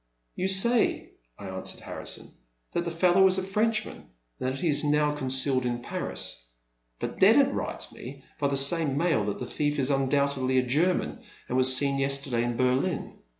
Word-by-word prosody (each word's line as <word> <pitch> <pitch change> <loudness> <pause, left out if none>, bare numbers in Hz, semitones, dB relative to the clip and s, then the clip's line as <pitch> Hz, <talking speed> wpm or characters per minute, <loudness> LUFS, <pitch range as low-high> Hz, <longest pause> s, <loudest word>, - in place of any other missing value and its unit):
You 185 - -2
say," 220 +5 +3 0.3
I 100 - -10
answered 95 0 -5
Harrison, - - -4 0.4
that 170 - -2
the - - -2
fellow 180 +3 +3
is 185 0 +3
a 190 - -1
Frenchman, 215 +3 -1 0.4
and 130 - -2
that 130 - -4
he 175 - -1
is 150 -1 +3
now 150 0 +1
con 140 -3 -4
cealed 130 0 0
in 120 -1 -3
Paris; - - -4 0.5
but - - -6
Dennet - - +5
writes - - -3
me 135 +2 -11 0.2
by 145 - +1
the 140 0 -1
same 140 0 +3
mail 165 -8 +1
that 105 - -3
the 125 - -6
thief 145 +4 -2
is 135 0 +1
undoubtedly 135 -1 0
a 130 - +3
German, 165 - 0 0.3
and - - -3
was 130 0 +6
seen 140 -1 0
yesterday 135 -3 0
in 120 -1 -3
Berlin. 130 +1 -1
140 Hz, 185 wpm, -26 LUFS, 130-170 Hz, 0.5 s, was